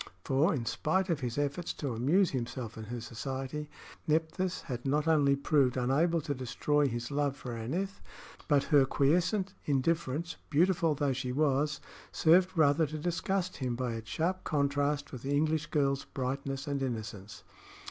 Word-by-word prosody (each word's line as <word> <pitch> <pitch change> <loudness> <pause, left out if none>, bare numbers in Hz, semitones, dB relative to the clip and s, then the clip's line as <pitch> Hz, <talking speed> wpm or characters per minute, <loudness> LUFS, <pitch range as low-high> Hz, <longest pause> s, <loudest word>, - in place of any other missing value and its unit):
For, 140 +5 +2
in 130 -7 -2
spite 185 +9 0
of 160 - 0
his 125 -2 -3
efforts 145 +4 -1
to 140 -5 -3
amuse 155 - +3
himself 125 -2 -4
in 110 - -7
her 120 +2 -5
society, 135 +5 -5 0.4
Nephthys 165 +4 0
had 125 -3 -5
not 150 +3 +1
only 145 -3 +4
proved 140 -2 +2
unable 155 +7 +2
to 145 - -2
destroy 140 +3 +1
his 120 +1 -4
love 145 -1 0
for 125 -3 -6
Aneth, 170 - -3 0.5
but 145 -3 +4
her 145 -3 +5
quiescent 175 +9 +1
indifference, 160 +3 0
beautiful 165 +1 +3
though 140 -1 +1
she 125 0 -3
was, 145 +2 +1 0.3
served 180 +3 +4
rather 155 +1 +4
to 155 +2 -5
disgust 180 +3 -1
him 125 -3 -2
by 125 -1 -2
its 115 0 -7
sharp 185 +3 -1
contrast 145 -1 0
with 130 - -7
the 140 +2 -1
English 155 +1 +1
girl's 140 -4 +1
brightness 135 +1 -3
and 140 -2 -2
innocence. 105 -5 -5
145 Hz, 160 wpm, -31 LUFS, 130-160 Hz, 0.5 s, her